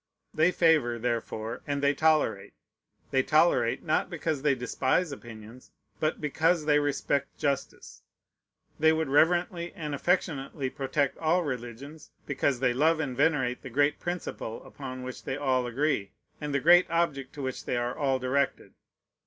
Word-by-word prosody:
They 155 +3 +4
favor, 155 -10 +3
therefore, 115 -1 -3
and 140 -1 -2
they 140 0 +4
tolerate. 155 -9 +1 0.6
They 135 - +3
tolerate, 150 -6 +2
not 155 -2 0
because 160 -5 -2
they 140 -1 +2
despise 130 +6 0
opinions, 115 -1 -11 0.3
but 155 +1 0
because 160 +2 +1
they 150 -1 +4
respect 140 -1 -1
justice. 140 -3 -3 0.8
They 160 +1 +5
would 160 -2 0
reverently 170 +3 +2
and 150 -3 -5
affectionately 140 -4 -1
protect 140 0 -1
all 170 +3 +2
religions, 130 +2 -7 0.2
because 140 -2 0
they 125 -2 +3
love 155 +5 +3
and 140 -5 -2
venerate 135 -4 +1
the 130 - -8
great 145 +4 +1
principle 175 -10 -5
upon 130 -3 -8
which 130 0 -7
they 130 - -3
all 130 -3 +1
agree, 120 -5 -1 0.3
and 150 -1 -3
the 140 - +1
great 175 +5 +6
object 150 -6 -1
to 145 - -7
which 130 -1 -4
they 125 - -1
are 120 +1 -2
all 135 -2 +1
directed. 130 +2 -1
140 Hz, 155 wpm, -28 LUFS, 130-155 Hz, 0.8 s, great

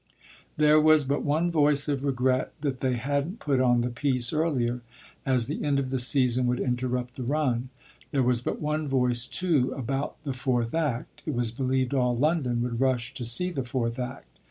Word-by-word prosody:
There 150 0 +5
was 155 -1 +5
but 140 +2 0
one 155 +4 +1
voice 145 -2 +2
of 140 -2 -1
regret 130 -1 0
that 135 -4 -2
they 130 -1 0
hadn't 140 - -2
put 140 - 0
on 120 -2 +3
the 120 +1 -2
piece 125 -1 0
earlier, 130 -7 0 0.5
as 125 -3 +2
the - - -4
end 145 -2 +1
of 135 -1 -2
the 130 - 0
season 125 -1 +3
would 125 +1 0
interrupt 125 0 -2
the 130 - -4
run. 130 -2 0 0.4
There 135 -2 +1
was 125 -1 +2
but - - -3
one 150 0 -2
voice 125 -3 +1
too 160 -9 +1
about 135 +3 -3
the 140 -3 -3
fourth 125 -2 -1
act 150 -8 -2
it 150 - -1
was 120 -2 0
believed 130 +1 -1
all 125 -2 +2
London 130 -3 +1
would 120 0 -3
rush 130 -3 0
to 120 - -4
see 180 +11 +2
the 140 -6 -3
fourth 120 -1 -2
act. 130 +2 -7
130 Hz, 195 wpm, -27 LUFS, 125-145 Hz, 0.5 s, There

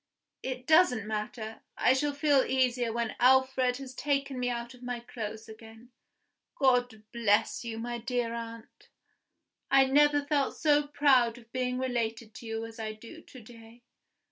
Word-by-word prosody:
It 255 -1 -5
doesn't 310 - +4
matter; 215 +1 -5 0.2
I - - +4
shall 290 +2 0
feel 285 -2 +3
easier 250 -2 +1
when 230 -1 -2
Alfred 260 0 +3
has 270 -2 -9
taken 275 -1 -2
me 245 0 0
out 235 0 -4
of 250 - -17
my 245 -1 -4
clothes 220 -2 -7
again. 225 +2 -14 0.6
God 245 -6 +1
bless 225 -1 +1
you, 230 -1 -5
my 240 +1 -4
dear 240 -1 -2
aunt! 230 0 -9 0.8
I 270 0 +6
never 290 +1 +3
felt 285 -2 0
so 295 -1 +3
proud 265 -5 +3
of 230 -1 -17
being 250 -1 -2
related 230 -3 -3
to 230 - -10
you 225 0 -4
as 225 0 -11
I 215 -1 -4
do 230 +9 -12
to 255 - -14
day. 230 +1 -15
245 Hz, 160 wpm, -29 LUFS, 225-265 Hz, 0.8 s, I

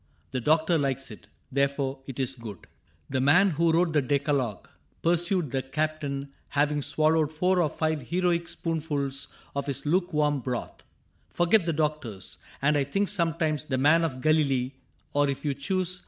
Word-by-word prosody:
The 130 -1 -2
doctor 160 +4 +3
likes 135 -2 -2
it, 105 - -12 0.2
therefore 140 0 0
it 135 -1 -7
is 130 0 -1
good. 115 -7 -9 0.5
The 130 -1 +1
man 175 +9 +5
who 165 +1 +2
wrote 165 0 +2
the 150 - +4
decalogue," 140 -6 -1 0.4
pursued 175 -2 +1
The 135 - 0
Captain, 140 0 -3 0.2
having 145 0 +1
swallowed 155 +1 +2
four 180 +3 +2
or 155 - +2
five 155 -1 -1
Heroic 175 -1 +1
spoonfuls 145 -4 -2 0.3
of 140 0 -2
his 140 0 -3
lukewarm 150 -3 +1
broth, 125 -1 -5 0.2
" - - -39
Forgot 175 +1 +3
the 165 - +1
doctors. 150 - -3 0.2
And 150 +1 +4
I - - +2
think 195 +9 0
sometimes 165 -5 0
The 130 -3 -1
man 150 +5 +4
of 130 -6 -2
Galilee 140 -4 +2 0.4
(or, 145 0 +3
if 140 +2 -4
you 145 - +1
choose. 180 +6 -1
150 Hz, 165 wpm, -27 LUFS, 135-165 Hz, 0.5 s, man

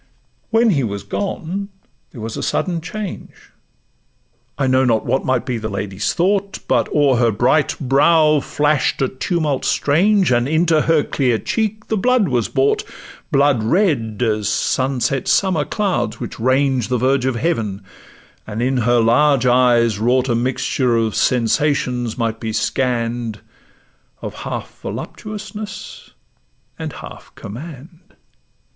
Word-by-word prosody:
When 225 0 +3
he 140 -7 +1
was 100 -3 -4
gone, 200 0 -4 0.4
there 120 - -11
was 110 0 -5
a - - -4
sudden 170 -3 -1
change: 205 +2 -8 1.1
I 140 - 0
know 130 0 +3
not 115 -4 +1
what 130 +3 0
might 130 -2 0
be 125 -3 -2
the 110 0 -4
lady's 100 0 -3
thought, 195 +3 0
But - - +1
o'er 140 -4 +3
her 120 -1 +3
bright 125 +8 +1
brow 150 +3 +4
flash'd 145 -1 0
a - - +2
tumult 150 0 -2
strange, 185 +4 +2
And 120 0 +2
into 160 +1 +2
her 160 -2 +2
dear 125 -5 0
cheek 215 - -2
the 220 - 0
blood 245 -1 +2
was 120 -4 0
brought, 135 0 +1 0.5
Blood 140 -4 +3
red 115 - +1
as 105 -3 0
sunset 130 +2 0
summer 180 -6 +2
clouds 120 - -1
which - - -7
range 130 0 +1
The 125 - 0
verge 130 +1 +1
of 130 - 0
Heaven; 110 - -2 0.6
and 110 0 -5
in 130 +2 +1
her 120 0 +2
large 130 +3 +3
eyes 120 -3 +3
wrought, 125 +3 +2
A - - +2
mixture 125 0 0
of 110 -2 0
sensations 125 -1 0
might 115 -2 -2
be 110 -1 -4
scann'd, 115 -1 -1 0.8
Of - - -6
half - - -7
voluptuousness 215 0 -7 0.7
and - - -4
half - - -11
command. 160 - -10
130 Hz, 140 wpm, -19 LUFS, 115-160 Hz, 1.1 s, brow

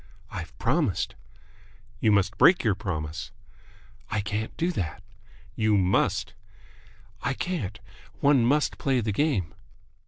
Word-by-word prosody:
"I've 85 -1 -7
promised." 135 - 0 0.9
"You 110 - +3
must 100 -1 +2
break 180 - +6
your 110 -4 +3
promise." 80 -5 -4 0.8
"I 110 - 0
can't 105 +2 -3
do 170 +2 +1
that." 90 - -4 0.5
"You 110 -2 +3
must!" 95 0 +1 0.9
"I 130 +2 -1
can't. 115 - -3 0.4
One 140 -4 +4
must 145 +5 +2
play 135 -2 +2
the 110 -1 -1
game." 105 - 0
105 Hz, 120 wpm, -27 LUFS, 95-140 Hz, 0.9 s, break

